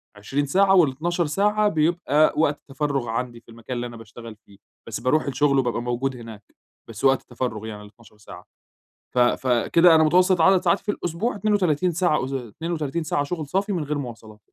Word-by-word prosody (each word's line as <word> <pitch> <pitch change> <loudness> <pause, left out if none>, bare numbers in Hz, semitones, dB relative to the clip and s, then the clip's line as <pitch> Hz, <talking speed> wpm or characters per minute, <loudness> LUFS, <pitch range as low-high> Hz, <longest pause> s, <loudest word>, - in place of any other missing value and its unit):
20 135 +8 -2
ساعة، 195 +6 +3
وال12 170 +2 +1
ساعة 210 +7 +1
بيبقى 155 -3 +2
وقت 150 -2 +1
تفَرُغ 140 -3 -2
عندي 120 0 -4
في 115 - -25
المكان 115 +2 -8
اللي 120 0 -3
أنا 120 -1 -10
باشتغل 115 0 -11
فيه. 100 -2 -22 0.3
بس 110 - -5
باروح 150 +5 +1
الشغل 140 0 +1
وبابقى 120 -2 -1
موجود 125 +2 -2
هناك 115 -3 -11 0.4
بس 115 0 -10
وقت 135 -1 +4
التفرغ 120 -3 -5
يعني 105 -1 -8
ال12 105 0 -18
ساعة، 105 - -13 0.7
ف - - -8
فكده 130 +7 +3
أنا 160 - +5
متوسط 180 +2 +3
عدد 190 +1 +5
ساعاتي 200 - +1
في 205 - -1
الأسبوع 175 +7 -3
32 185 -5 +1
ساعة 170 -5 +1
أس 135 - -6
32 155 +6 -4
ساعة 145 -2 -1
شغل 155 0 -5
صافي 195 +5 -1
من 165 -4 -2
غير 150 0 -3
مواصلات. 115 -5 -9
140 Hz, 180 wpm, -23 LUFS, 120-170 Hz, 0.7 s, أنا